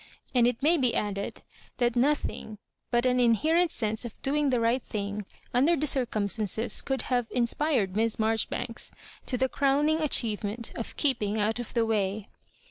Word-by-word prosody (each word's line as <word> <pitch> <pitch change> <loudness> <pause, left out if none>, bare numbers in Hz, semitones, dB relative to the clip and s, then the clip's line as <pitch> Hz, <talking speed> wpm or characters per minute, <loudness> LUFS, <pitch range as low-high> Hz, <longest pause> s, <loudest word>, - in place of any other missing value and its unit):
And 240 -2 +4
it 245 +1 -2
may 330 +3 +5
be 250 -3 +2
added 200 -1 -3 0.3
that 240 -1 +2
nothkg 245 -4 0 0.3
but 240 0 +1
an 250 0 +3
inherent 310 - +3
sense 220 -5 -2
of 235 -3 -8
doing 285 +1 +1
the 250 -2 +2
right 230 +3 +2
thing 205 -2 -4 0.3
under 280 +8 +4
the 305 -1 -1
circumstances 220 -4 0
could 270 -1 -2
have 245 -2 +1
in 245 -1 +1
spired 235 -8 0
Miss 225 +1 +1
i^arjoribanks 220 0 -1 0.4
to 250 - 0
the 260 +1 +2
crowning 285 +4 +2
achievement 225 -5 0
ofr'keeping 225 -3 -1
out 215 +2 0
of 240 - -7
the 230 -1 +3
way. 210 -2 -1
240 Hz, 160 wpm, -28 LUFS, 215-270 Hz, 0.4 s, may